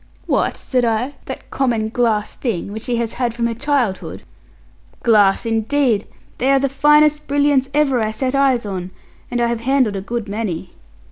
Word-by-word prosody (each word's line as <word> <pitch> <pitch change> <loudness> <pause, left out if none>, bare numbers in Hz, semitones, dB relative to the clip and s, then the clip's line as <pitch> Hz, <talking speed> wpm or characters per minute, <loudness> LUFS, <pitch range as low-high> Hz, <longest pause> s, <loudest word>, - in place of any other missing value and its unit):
'What,' - - 0
said 250 -2 -1
I, 235 +4 0
'that - - -8
common 230 -5 0
glass 220 -3 0
thing, 205 -6 -3
which 220 - -5
she 240 +1 -2
has 230 -1 -2
had 240 -2 -2
from 235 -1 -1
her 235 - 0
childhood!' 240 -5 -1 0.8
'Glass 210 -4 +4
indeed! 225 0 +1 0.3
They 260 - +1
are 275 - +5
the 275 0 +1
finest 300 +2 +3
brilliants 285 -2 +2
ever 280 -4 +2
I 215 - 0
set 255 +4 -2
eyes 270 -4 +2
on; 185 -3 -4 0.4
and 245 - -2
I 240 - +2
have 235 -1 -1
handled 255 -4 +2
a 195 - -3
good 230 +2 -4
many.' 200 -4 -4
235 Hz, 180 wpm, -19 LUFS, 220-270 Hz, 0.8 s, are